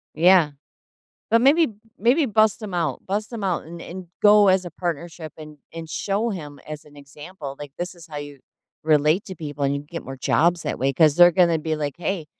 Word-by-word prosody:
Yeah. 170 Hz, -1 st, +5 dB, 0.8 s
But 230 Hz, +1 st, +4 dB
maybe 305 Hz, +4 st, +5 dB, 0.3 s
maybe 255 Hz, +8 st, +3 dB
bust 215 Hz, -2 st, +2 dB
him 205 Hz, -4 st, -7 dB
out 160 Hz, -7 st, -2 dB
bust 210 Hz, +4 st, -3 dB
him 225 Hz, -3 st, -6 dB
out 185 Hz, -3 st, -1 dB
and 170 Hz, +2 st, -10 dB
and 185 Hz, 0 st, -9 dB
go 210 Hz, -1 st, +6 dB
as 185 Hz, -1 st, +3 dB
a 175 Hz, -, -7 dB
partnership 170 Hz, -2 st, -5 dB
and 150 Hz, -1 st, -11 dB
and 165 Hz, -1 st, -8 dB
show 205 Hz, +7 st, -1 dB
him 145 Hz, -6 st, -8 dB
as 150 Hz, -1 st, -8 dB
an 145 Hz, 0 st, -18 dB
example. 145 Hz, +1 st, -10 dB
Like, 145 Hz, -2 st, -8 dB
this 180 Hz, +1 st, -4 dB
is 170 Hz, -1 st, -14 dB
how 150 Hz, -2 st, -7 dB
you 145 Hz, -1 st, -8 dB, 0.4 s
relate 155 Hz, +4 st, +2 dB
to 190 Hz, -, -8 dB
people 145 Hz, -2 st, -6 dB
and 140 Hz, 0 st, +1 dB
you 140 Hz, -, -4 dB
get 165 Hz, +3 st, -8 dB
more 135 Hz, 0 st, -8 dB
jobs 170 Hz, +6 st, +1 dB
that -, -, -3 dB
way 135 Hz, +1 st, +1 dB
'cause 155 Hz, +1 st, +4 dB
they're 175 Hz, 0 st, +7 dB
gonna 170 Hz, -2 st, +3 dB
be 160 Hz, 0 st, -2 dB
like, 145 Hz, -3 st, -4 dB
"Hey, 175 Hz, -1 st, -3 dB
165 Hz, 215 wpm, -23 LUFS, 150-190 Hz, 0.8 s, they're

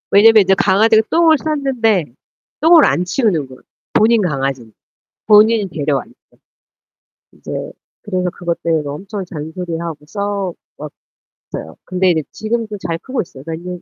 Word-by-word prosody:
왜냐하면 220 Hz, +1 st, +7 dB
인제 190 Hz, 0 st, +3 dB
강아지가 215 Hz, +3 st, +4 dB
똥을 325 Hz, -2 st, +4 dB
쌌는데 260 Hz, -, 0 dB, 0.6 s
똥을 320 Hz, 0 st, +7 dB
안 180 Hz, -, +1 dB
치우는 180 Hz, -, 0 dB
거야, 130 Hz, 0 st, -13 dB, 0.4 s
본인 225 Hz, 0 st, +4 dB
강아지인데 135 Hz, -, -3 dB, 0.5 s
본인이 215 Hz, 0 st, +5 dB
데려왔는데. 145 Hz, -5 st, -2 dB, 1.2 s
이제 -, -, -12 dB, 0.5 s
그래서 185 Hz, -3 st, -2 dB
그것 170 Hz, 0 st, -4 dB
때문에 160 Hz, -3 st, 0 dB
엄청 190 Hz, +7 st, -6 dB
잔소리하고 165 Hz, -1 st, -6 dB
싸워 200 Hz, -1 st, -3 dB, 0.8 s
웠어요. 80 Hz, -, -9 dB
근데 185 Hz, 0 st, +1 dB
이제 160 Hz, -2 st, +1 dB
지금도 220 Hz, -1 st, -3 dB
잘 170 Hz, -3 st, -4 dB
크고 260 Hz, -1 st, -3 dB
있어요. 135 Hz, -6 st, -14 dB
몇 165 Hz, -, -3 dB
년 180 Hz, 0 st, -7 dB
190 Hz, 325 characters per minute, -17 LUFS, 165-220 Hz, 1.2 s, 왜냐하면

